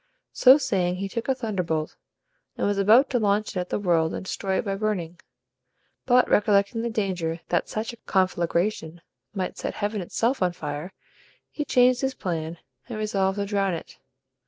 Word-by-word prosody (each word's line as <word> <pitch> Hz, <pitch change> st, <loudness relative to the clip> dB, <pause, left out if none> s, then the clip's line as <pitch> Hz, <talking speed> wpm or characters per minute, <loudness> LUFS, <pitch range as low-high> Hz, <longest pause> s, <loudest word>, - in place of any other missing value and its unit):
So 260 Hz, +2 st, +7 dB
saying 195 Hz, -10 st, 0 dB
he 195 Hz, +2 st, -3 dB
took 230 Hz, +4 st, -5 dB
a 265 Hz, -, +3 dB
thunderbolt, 180 Hz, -10 st, -2 dB, 0.6 s
and -, -, 0 dB
was 205 Hz, 0 st, 0 dB
about 225 Hz, +8 st, +6 dB
to 245 Hz, -, +2 dB
launch 210 Hz, 0 st, +1 dB
it -, -, -6 dB
at 180 Hz, -, -4 dB
the -, -, 0 dB
world, 170 Hz, -5 st, +1 dB
and -, -, -6 dB
destroy 190 Hz, 0 st, -2 dB
it -, -, -2 dB
by 200 Hz, -, -1 dB
burning; 195 Hz, -5 st, -2 dB, 0.9 s
but 250 Hz, 0 st, +5 dB
recollecting 205 Hz, +2 st, +2 dB
the 235 Hz, -, -2 dB
danger 180 Hz, -7 st, -2 dB
that 175 Hz, -, 0 dB
such 220 Hz, +2 st, -3 dB
a -, -, -12 dB
conflagration 175 Hz, -3 st, -1 dB, 0.3 s
might 185 Hz, -2 st, -3 dB
set -, -, -4 dB
heaven 205 Hz, 0 st, -2 dB
itself 230 Hz, +8 st, -1 dB
on 180 Hz, -1 st, +2 dB
fire, 150 Hz, +2 st, -5 dB, 0.6 s
he 300 Hz, -, -3 dB
changed 250 Hz, -3 st, +3 dB
his 265 Hz, -1 st, -1 dB
plan, 165 Hz, -3 st, -4 dB, 0.3 s
and -, -, -5 dB
resolved 195 Hz, -2 st, 0 dB
to 200 Hz, -, -1 dB
drown 195 Hz, -3 st, 0 dB
it. 165 Hz, -, -10 dB
195 Hz, 180 wpm, -25 LUFS, 175-220 Hz, 0.9 s, So